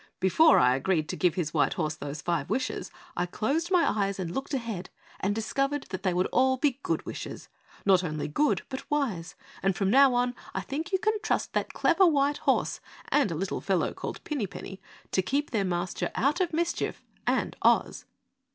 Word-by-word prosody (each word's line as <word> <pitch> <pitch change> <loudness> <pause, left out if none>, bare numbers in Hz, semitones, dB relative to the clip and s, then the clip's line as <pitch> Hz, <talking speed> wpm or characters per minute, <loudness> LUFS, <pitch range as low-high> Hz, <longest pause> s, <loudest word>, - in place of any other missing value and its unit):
"Before 250 - +5
I 125 0 +5
agreed 155 +3 0
to - - -2
give 180 -3 +2
his 165 -5 -2
white 150 - +2
horse 155 -2 -1
those 145 0 -6
five 170 -1 -1
wishes, 260 - -2 0.3
I 175 +1 0
closed 285 - -1
my 360 -3 +4
eyes, 200 -2 0
looked 195 - -3
ahead, 225 -8 -4 0.3
and 200 +1 0
discovered 275 +6 -1
that 185 -1 -4
they 185 -1 +1
would 180 +1 +1
all 260 +1 +3
be 275 -1 +1
good - - -1
wishes. - - -7 0.4
Not 185 -2 +5
only 155 -3 -3
good 295 - +1
but 265 +2 -7
wise, 235 - -1 0.3
and 195 -1 +1
from 195 +2 +1
now 270 0 +6
on 245 0 +1 0.2
I - - 0
think 310 +6 -4
you 380 - +3
can 430 +2 0
trust 435 - -1
that - - -1
clever 370 +2 +4
white 290 -2 +2
horse - - +1 0.3
and 290 -8 +3
a 165 - -3
little 185 +4 -2
fellow 190 -3 0
called - - -6
Pinny 280 -10 -2
Penny 190 +1 -9 0.3
to 190 - +2
keep 280 +11 -1
their 215 -4 +1
Master 175 0 -2
out 285 +8 +2
of 355 - +1
mischief 340 +2 -1 0.2
and - - +1
Oz." - - +2
215 Hz, 195 wpm, -28 LUFS, 180-285 Hz, 0.4 s, now